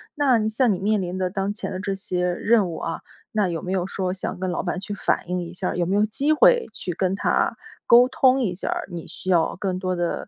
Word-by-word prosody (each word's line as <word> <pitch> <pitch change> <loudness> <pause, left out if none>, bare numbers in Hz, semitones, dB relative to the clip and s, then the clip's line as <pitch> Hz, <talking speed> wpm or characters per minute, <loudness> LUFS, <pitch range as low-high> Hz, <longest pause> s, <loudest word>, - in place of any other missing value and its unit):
那 275 -5 +3
你 215 0 0
像 235 +1 +2
你 - - -4
面 210 0 +1
临 180 +1 -4
的 185 -1 0
当 195 +1 -2
前 220 -2 -5
的 185 - -4
这 195 -1 -2
些 180 -2 -2
任 210 +1 +2
务 165 - -5
啊， 165 - -4 0.3
那 210 -3 +1
有 170 -2 -3
没 185 - -5
有 185 -1 0
说 185 -2 -2
想 185 - -5
跟 185 -1 -2
老 - - -1
板 180 0 -3
去 205 - -5
反 185 -2 -1
映 180 0 -1
一 170 0 -7
下 185 0 -2
儿？ - - -3
有 175 - +1
没 190 +3 0
有 210 +1 +4
机 280 +8 +1
会 - - +5
去 180 - -5
跟 185 +2 0
他 - - +1 0.3
沟 245 +2 +7
通 260 0 +3
一 190 -7 0
下 180 - -6
儿， - - -2
你 170 -2 -7
需 190 - -6
要 170 -3 +2
更 185 -1 -2
多 185 -1 -1
的， 175 -1 -2
190 Hz, 285 characters per minute, -23 LUFS, 180-215 Hz, 0.3 s, 沟